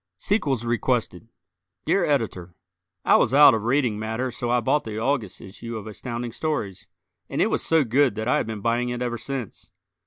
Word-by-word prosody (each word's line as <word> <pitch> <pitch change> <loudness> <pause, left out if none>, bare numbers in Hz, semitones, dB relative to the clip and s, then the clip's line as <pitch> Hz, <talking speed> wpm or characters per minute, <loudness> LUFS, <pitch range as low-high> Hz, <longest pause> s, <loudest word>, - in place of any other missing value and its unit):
Sequels 135 - 0
Requested 115 -4 -1 0.6
Dear 175 +4 +2
Editor: 110 - -1 0.5
I - - +6
was 135 - +2
out 145 -3 +9
of 110 -1 -2
reading 120 -4 +1
matter 110 +4 -3
so 120 0 -4
I 120 0 +3
bought 145 +6 +1
the 110 -1 -6
August 115 -4 -1
issue 115 +4 -8
of 110 - -8
Astounding 120 +2 -5
Stories, 115 - -3 0.4
and - - -3
it - - +2
was - - 0
so 160 -2 +3
good 130 0 +2
that 110 +1 -3
I 130 - +3
have - - -1
been 110 -2 -5
buying 120 +2 0
it 120 0 -3
ever 120 -1 -3
since. 125 -1 -6
120 Hz, 190 wpm, -24 LUFS, 110-135 Hz, 0.6 s, out